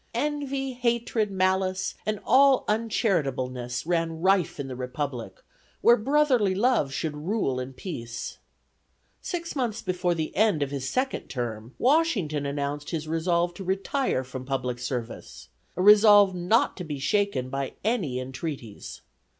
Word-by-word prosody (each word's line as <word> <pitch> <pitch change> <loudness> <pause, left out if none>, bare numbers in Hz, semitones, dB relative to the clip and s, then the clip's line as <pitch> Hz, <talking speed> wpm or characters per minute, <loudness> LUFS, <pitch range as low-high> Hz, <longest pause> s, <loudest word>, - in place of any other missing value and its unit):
"Envy, 275 -3 -2
hatred, 235 -3 0
malice, 190 0 0
and 215 -1 -1
all 270 0 +5
uncharitableness" 135 - -1
ran 165 -1 -1
rife 185 -3 +2
in 140 - -3
the 130 - -6
Republic 125 -1 -5 0.4
where 235 - +7
brotherly 250 -5 +2
love 220 - +2
should 150 +2 -3
rule 150 - -1
in 130 +1 -5
peace. 120 -6 -6 0.8
Six 340 -3 -4
months 235 -4 -2
before 180 -1 0
the 160 -1 -3
end 205 -8 +3
of 140 - -4
his 135 -2 -3
second 265 +1 -1
term, 120 -2 -5
Washington 225 - +2
announced 145 +1 -3
his 155 -2 -3
resolve 170 +2 +1
to 195 - -8
retire 195 - -1
from 130 0 -7
public 130 -2 -2
service; 120 -1 -6 0.3
a 180 - +1
resolve 205 -1 +7
not 180 +6 +2
to 180 - -5
be 150 -4 -5
shaken 140 -3 0
by 135 -1 -3
any 190 - 0
entreaties. 130 -3 -6
175 Hz, 140 wpm, -26 LUFS, 135-220 Hz, 0.8 s, where